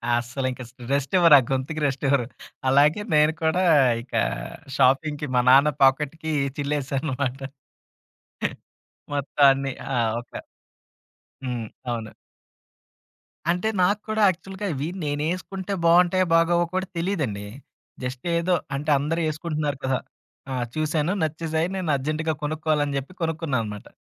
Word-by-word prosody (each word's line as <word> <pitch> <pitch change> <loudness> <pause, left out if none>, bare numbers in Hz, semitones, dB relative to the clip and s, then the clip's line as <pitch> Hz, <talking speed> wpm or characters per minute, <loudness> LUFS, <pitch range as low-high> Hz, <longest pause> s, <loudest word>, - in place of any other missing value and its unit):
అస్సలింక 125 +2 -3
స్ - - -23 0.2
రెస్టివ్వరా 145 +3 +6
ఆ - - -6
గొతుకి 135 +4 -2
రెస్టివ్వరు. 135 -1 +1 0.4
అలాగే 145 +8 +4
నేను 150 +1 +5
కూడా 160 +4 +2 0.4
ఇక 120 - -17 0.6
షాపింగ్‌కి 150 +3 +2
మా 125 - +5
నాన్న 135 +3 +7
పాకెట్‌కి 150 +4 +2 0.3
చిల్లేసాననమాట. 140 -2 -2 1.7
మొత్తం 145 0 0
అన్ని. 135 0 -3 0.2
ఆ! - - +1 0.3
ఒక 120 - -22 1.1
హ్మ్. 120 -3 -3 0.2
అవును. 115 -2 -4 1.4
అంటే 180 +5 0
నాకు 200 +3 +2
కూడా 215 0 0
యాక్చువల్‌గా 190 +3 -4
ఇవి 140 +3 -3 0.2
నేనేసుకుంటే 180 +6 -3
బావుంటాయో 180 +2 +4
బాగావో 170 +1 +3
కూడా 185 0 0
తెలీదండి. 150 - -2 0.6
జస్ట్ 125 +4 -5
ఏదో 180 +2 +1 0.2
అంటే, 145 +3 -2
అందరూ 155 +4 -1
ఏసుకుంటున్నారు 150 -2 -3
కదా! 130 -1 +1 0.5
ఆ! - - -2 0.2
చూసాను 155 +2 0
నచ్చేసాయి 160 +1 -1
నేను 180 -4 -2
అర్జెంట్‌గా 155 +3 -1
కొనుక్కోవాలని 150 -1 0
జెప్పి 140 +7 -8
కొనుక్కున్నాననమాట. 135 -11 -2
150 Hz, 110 wpm, -24 LUFS, 135-165 Hz, 1.7 s, నాన్న